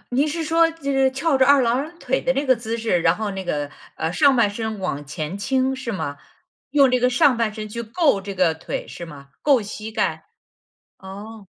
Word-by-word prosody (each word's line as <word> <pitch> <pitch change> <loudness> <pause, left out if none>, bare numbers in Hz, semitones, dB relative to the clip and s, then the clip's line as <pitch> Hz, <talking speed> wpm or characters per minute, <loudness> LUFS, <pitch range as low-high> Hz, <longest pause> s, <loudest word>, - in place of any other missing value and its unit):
您 285 +3 +3
是 325 +2 -2
说， 330 +1 +3
就 325 -4 -4
是 270 -1 +3
翘 275 +1 +1
着 260 - +4
二 280 -1 +6
郎 270 +8 -1
腿 260 +1 -1
的 260 - +1
那 280 +2 -1
个 260 -1 +4
姿 230 0 -4
势， 220 -6 +1
然 165 0 +3
后 215 -2 -2
那 190 -1 -5
个， 145 -3 -3 0.2
呃， 160 +2 -2
上 280 -3 +4
半 230 -3 +4
身 220 0 -4
往 145 -6 -3
前 155 +5 -5
倾 265 +4 0
是 245 -3 -5
吗？ 145 -7 -4 0.5
用 275 -3 +4
这 250 - +3
个 250 +1 +3
上 260 0 +4
半 230 -2 0
身 215 -1 -6
去 235 +3 -5
够 235 - +1
这 200 0 -7
个 180 -3 +3
腿， 160 - -6
是 170 - -8
吗？ 140 -3 -12
够 280 -4 +4
膝 215 +2 -7
盖， - - -1 0.7
哦。 200 +2 -10
230 Hz, 235 characters per minute, -22 LUFS, 195-270 Hz, 0.7 s, 二